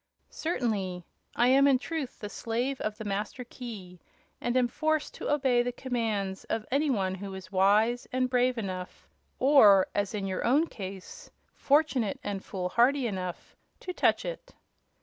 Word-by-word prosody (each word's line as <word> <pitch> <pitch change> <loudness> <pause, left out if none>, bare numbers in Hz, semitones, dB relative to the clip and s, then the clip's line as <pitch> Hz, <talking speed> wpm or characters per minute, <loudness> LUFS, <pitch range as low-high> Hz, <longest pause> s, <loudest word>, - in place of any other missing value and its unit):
"Certainly. 200 - -2 0.3
I 240 +1 +4
am, 275 +2 +6
in 270 -2 +5
truth, 280 0 -5
the 210 - -4
Slave 240 +5 -3
of 215 0 -3
the 220 - -6
Master 205 +4 -3
Key, 215 -8 -9 0.4
and 240 +1 0
am 250 -1 +3
forced 310 +4 -1
to - - -4
obey 265 -4 +3
the 245 +1 -1
commands 225 -7 -2
of 220 -1 -3
any 285 +3 +2
one 195 -7 0
who 195 0 -6
is 190 +1 -10
wise 210 +5 +3
and 255 0 +1
brave 250 0 +2
enough 185 -4 -6 0.3
or, 220 -9 +6
as 205 +1 -1
in 200 -2 -3
your 190 -1 -2
own 285 +7 +3
case, 190 - -9 0.2
fortunate 280 -7 +1
and 200 -1 -4
fool 180 -2 -4
hardy 255 +6 +3
enough 185 -5 -5 0.3
to 365 - -5
touch - - +2
it." - - -7
230 Hz, 165 wpm, -29 LUFS, 195-260 Hz, 0.4 s, am